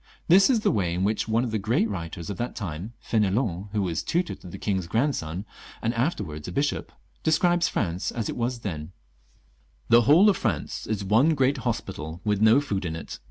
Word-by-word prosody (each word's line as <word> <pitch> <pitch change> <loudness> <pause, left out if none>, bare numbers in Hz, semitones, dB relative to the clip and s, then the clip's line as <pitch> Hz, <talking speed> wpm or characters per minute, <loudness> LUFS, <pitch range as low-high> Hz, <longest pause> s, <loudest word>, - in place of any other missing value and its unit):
This 190 +6 +6
is 240 -5 +3
the 205 - +2
way 90 - 0
in 90 - -1
which 105 +3 0
one 115 +2 +2
of 120 - -3
the 110 - 0
great 110 +3 +1
writers 85 -3 -5
of 95 - -6
that 120 +1 -3
time 95 +2 -5
— - - -26
^F^n^lon, 105 -3 +1
who 105 -1 0
was 85 -4 -1
tutor 175 0 -1
to - - -12
the 85 - -8
king's 95 -4 -2
grand 130 - +1
son, 80 +6 -5 0.3
and 115 - -1
afterwards 115 - -2
a - - -4
bishop 145 +1 -1 0.2
— - - -38
describes 175 +2 +3
France 90 -3 -1
as 115 -3 -3
it - - -4
was 120 0 -2
then: 80 -4 -5 0.3
— - - -36
" - - -36
The 120 - +7
whole 155 - +6
of 200 - +4
France 100 - -2
is 105 -2 -2
one 115 +11 +4
great 135 +1 +2
hospital, 80 -8 -4
with 105 -1 0
no 110 +4 +6
food 105 -10 -2
in 80 -2 -3
it. 80 - -7
110 Hz, 225 wpm, -26 LUFS, 90-130 Hz, 0.3 s, The